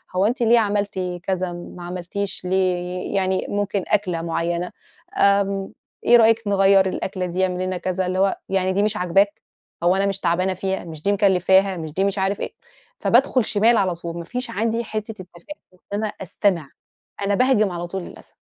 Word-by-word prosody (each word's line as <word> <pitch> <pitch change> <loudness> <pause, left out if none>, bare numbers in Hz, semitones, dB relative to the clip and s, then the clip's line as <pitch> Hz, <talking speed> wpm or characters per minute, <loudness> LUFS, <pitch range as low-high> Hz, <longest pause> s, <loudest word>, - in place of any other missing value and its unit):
هو 190 - +3
أنتِ 240 +3 0
ليه 230 +1 +5
عملتِ 205 -2 -1 0.2
كذا 185 -2 -1
ما 175 0 -9
عملتيش 180 +2 -5
ليه 180 0 -1
يعني 190 -1 0
ممكن 205 -2 -1
أكلة 180 -5 0
مُعينة، 170 +1 -2 0.5
آمم، 200 -1 +2 0.3
إيه 240 - +7
رأيِك 225 0 +4
نغيّر 195 -1 +5
الأكلة 185 0 -3
دي؟ 180 +1 -1
اعملي 185 0 -1
لنا 185 -1 -2
كذا. 185 +1 -2
اللي 185 +1 -1
هو 195 0 +2
يعني 190 -1 +1
دي 200 +2 +2
مش 215 0 0
عاجباك؟ 195 +4 +2 0.4
هو 180 +2 +4
أنا 195 +1 +1
مش 195 -1 -1
تعبانة 185 +2 +1
فيها، 190 +1 -3
مش 155 -2 -9
دي 200 - +2
مكلّفاها 190 -1 +3
مش 160 -2 -6
دي 190 - 0
مش 200 0 0
عارف 195 +1 0
إيه، - - -4 0.5
فبادخل 255 -4 +3
شمال 220 +2 +3
على 185 -3 +1
طول 170 0 -7
ما 170 - -5
فيش 250 +7 -5
عندي 230 +3 -1
حتّة 215 0 -4
التفاهُم، 185 +12 -12 0.2
إن 180 - -24
أنا 215 +1 0
أستمع، 180 -5 0 0.5
أنا 200 0 +1
باهجم 215 -6 +3
على 175 0 -4
طول 190 +1 -4
للأسف. - - -13
190 Hz, 185 wpm, -22 LUFS, 180-205 Hz, 0.5 s, إيه